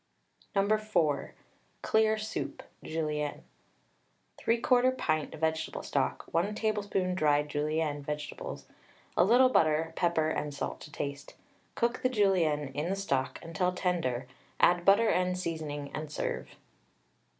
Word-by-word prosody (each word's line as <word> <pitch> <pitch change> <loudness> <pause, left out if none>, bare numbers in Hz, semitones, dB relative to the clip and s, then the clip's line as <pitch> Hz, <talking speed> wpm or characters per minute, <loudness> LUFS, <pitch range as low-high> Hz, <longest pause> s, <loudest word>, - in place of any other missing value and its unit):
No. 200 +2 +3
4. 170 -10 0 0.5
CLEAR 220 0 +3
SOUP 215 0 -4 0.2
(Julienne). 150 -2 -2 1.0
3/4 250 +2 +3
pint 155 -2 -1
vegetable 160 0 -1
stock, - - -1
1 195 +6 +1
tablespoonful 205 -4 0
dried 150 -4 +2
Julienne 150 0 -1
(vegetables), 150 +1 -5 0.5
a - - +5
little 245 +6 +6
butter, 160 -7 +2
pepper 160 -3 +1
and 150 -2 -3
salt - - -4
to 150 - -11
taste. 140 -1 -5 0.4
Cook 235 +1 0
the 255 - +2
Julienne 175 - +2
in 150 +5 -3
the 195 - 0
stock 135 -9 -1
until 180 +2 -1
tender, 165 -10 -1 0.3
add 175 0 +4
butter 210 +3 +6
and 180 0 +1
seasoning 155 -5 -4
and 155 0 -5
serve. - - -3
165 Hz, 125 wpm, -30 LUFS, 150-200 Hz, 1.0 s, little